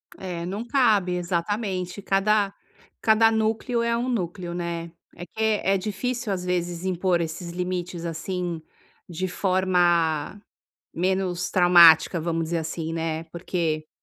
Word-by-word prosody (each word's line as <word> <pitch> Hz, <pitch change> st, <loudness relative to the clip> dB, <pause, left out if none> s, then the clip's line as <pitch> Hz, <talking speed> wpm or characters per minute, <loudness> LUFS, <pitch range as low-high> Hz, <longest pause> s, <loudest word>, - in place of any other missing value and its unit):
É 175 Hz, -2 st, -5 dB
não 200 Hz, +5 st, -4 dB
cabe, 215 Hz, -9 st, +2 dB
exatamente, 180 Hz, +2 st, -2 dB
cada 200 Hz, +1 st, +2 dB, 0.5 s
cada 225 Hz, 0 st, +5 dB
núcleo 220 Hz, +2 st, 0 dB
é 235 Hz, 0 st, +1 dB
um 250 Hz, +2 st, -2 dB
núcleo, 180 Hz, -5 st, -3 dB
né. 170 Hz, -1 st, -4 dB, 0.2 s
É 175 Hz, -, -8 dB
que 200 Hz, -, -14 dB
é 210 Hz, -3 st, +2 dB
difícil, 225 Hz, +4 st, -3 dB
às 180 Hz, -, -4 dB
vezes, 175 Hz, -1 st, -2 dB
impor 180 Hz, -1 st, +1 dB
esses 170 Hz, +2 st, -5 dB
limites, 180 Hz, -1 st, -4 dB
assim, 170 Hz, 0 st, -4 dB, 0.5 s
de 180 Hz, +2 st, -3 dB
forma 180 Hz, -3 st, +1 dB, 0.5 s
menos 185 Hz, 0 st, -1 dB
traumática, 175 Hz, -1 st, +6 dB
vamos 165 Hz, 0 st, -1 dB
dizer 170 Hz, +1 st, -2 dB
assim, 160 Hz, 0 st, -4 dB
né, 165 Hz, -1 st, -2 dB
porque 165 Hz, -2 st, -3 dB
180 Hz, 130 wpm, -24 LUFS, 170-200 Hz, 0.5 s, traumática